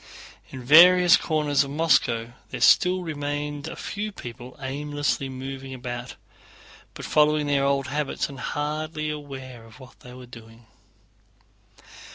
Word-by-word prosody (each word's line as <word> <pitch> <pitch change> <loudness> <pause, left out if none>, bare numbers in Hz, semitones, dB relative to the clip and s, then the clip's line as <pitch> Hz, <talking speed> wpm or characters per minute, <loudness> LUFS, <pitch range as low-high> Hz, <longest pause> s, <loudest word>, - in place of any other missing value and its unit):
In 130 -1 -9
various 175 +5 +7
corners 150 -3 +1
of 140 - -8
Moscow 135 -6 +1 0.2
there - - -6
still 180 0 +4
remained 145 -1 -4
a - - -7
few 210 +1 -5
people 125 - -10
aimlessly 140 -1 -3
moving 135 0 -7
about, 120 0 -7 0.8
following 150 0 +2
their 140 -1 +1
old 140 -1 +1
habits 145 +1 -2
and 140 -2 -11
hardly 155 +2 -3
aware 135 -5 -9
of 115 +3 -16
what 130 -2 -15
they 125 0 -13
were 125 0 -11
doing. 115 -1 -15
140 Hz, 130 wpm, -24 LUFS, 130-150 Hz, 0.8 s, various